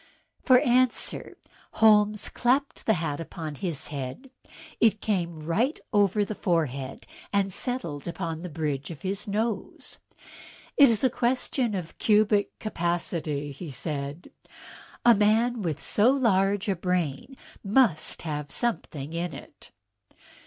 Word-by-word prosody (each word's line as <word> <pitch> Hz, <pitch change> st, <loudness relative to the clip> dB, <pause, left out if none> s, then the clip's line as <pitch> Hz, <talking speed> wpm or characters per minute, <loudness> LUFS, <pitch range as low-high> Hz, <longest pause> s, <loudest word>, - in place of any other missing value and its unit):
For 255 Hz, -2 st, +6 dB
answer 250 Hz, 0 st, +1 dB, 0.4 s
Holmes 210 Hz, -1 st, +4 dB
clapped 265 Hz, +3 st, 0 dB
the 220 Hz, -, +4 dB
hat 155 Hz, -3 st, -3 dB
upon 160 Hz, -2 st, -6 dB
his 155 Hz, -1 st, -4 dB
head. 145 Hz, -, -6 dB, 0.5 s
It 220 Hz, -2 st, +4 dB
came 170 Hz, -7 st, -2 dB
right 230 Hz, -, 0 dB
over 205 Hz, 0 st, +3 dB
the 215 Hz, -, -4 dB
forehead 140 Hz, -9 st, -2 dB, 0.3 s
and 195 Hz, -2 st, +1 dB
settled 175 Hz, -, -4 dB
upon 165 Hz, -2 st, -4 dB
the 180 Hz, -, -6 dB
bridge 150 Hz, -4 st, -3 dB
of 165 Hz, +1 st, -9 dB
his 195 Hz, +2 st, -3 dB
nose. 215 Hz, +2 st, -3 dB, 0.8 s
"It 280 Hz, -3 st, +8 dB
is 225 Hz, 0 st, +1 dB
a 260 Hz, -, +5 dB
question 250 Hz, -2 st, 0 dB
of 170 Hz, -3 st, -6 dB
cubic 210 Hz, -1 st, +2 dB
capacity," 165 Hz, -6 st, -2 dB, 0.2 s
said 145 Hz, +2 st, -5 dB
he; -, -, -30 dB, 0.5 s
"a 240 Hz, -, +9 dB
man 225 Hz, +3 st, +2 dB
with 160 Hz, -5 st, -2 dB
so 215 Hz, +4 st, +3 dB
large 205 Hz, -7 st, +2 dB
a 195 Hz, -, +1 dB
brain 180 Hz, -, -2 dB, 0.3 s
must 200 Hz, -, +2 dB
have 150 Hz, -3 st, -4 dB
something 160 Hz, -, -3 dB
in 170 Hz, 0 st, -3 dB
it." -, -, -13 dB
190 Hz, 130 wpm, -27 LUFS, 160-220 Hz, 0.8 s, a